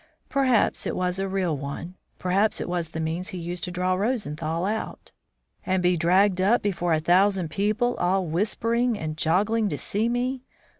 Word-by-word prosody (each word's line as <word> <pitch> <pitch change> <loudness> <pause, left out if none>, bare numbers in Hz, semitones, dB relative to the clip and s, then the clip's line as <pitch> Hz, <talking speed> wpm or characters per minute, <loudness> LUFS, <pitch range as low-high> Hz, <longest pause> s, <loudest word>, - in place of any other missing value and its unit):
Perhaps 255 -6 +2
it - - -2
was 180 +1 -1
a 195 - -1
real 185 -5 0
one, 140 +5 -6 0.2
perhaps 195 +4 +1
it - - -3
was 175 -2 -2
the 160 - -6
means 165 +3 -2
he 185 - -5
used 175 0 -4
to - - -5
draw 180 +1 0
Rosenthal 175 - -1
out. 215 +2 -4 0.5
"And 185 -1 0
be 180 0 +3
dragged 185 +3 +3
up 210 +6 +3
before 175 -4 0
a 155 - +2
thousand 180 +1 +2
people, 215 +7 0
all 185 +1 +1
whispering 230 +7 0
and 155 -4 -4
joggling 205 +7 +1
to - - -3
see 215 +3 -1
me? 250 +2 -1
185 Hz, 180 wpm, -25 LUFS, 175-210 Hz, 0.5 s, be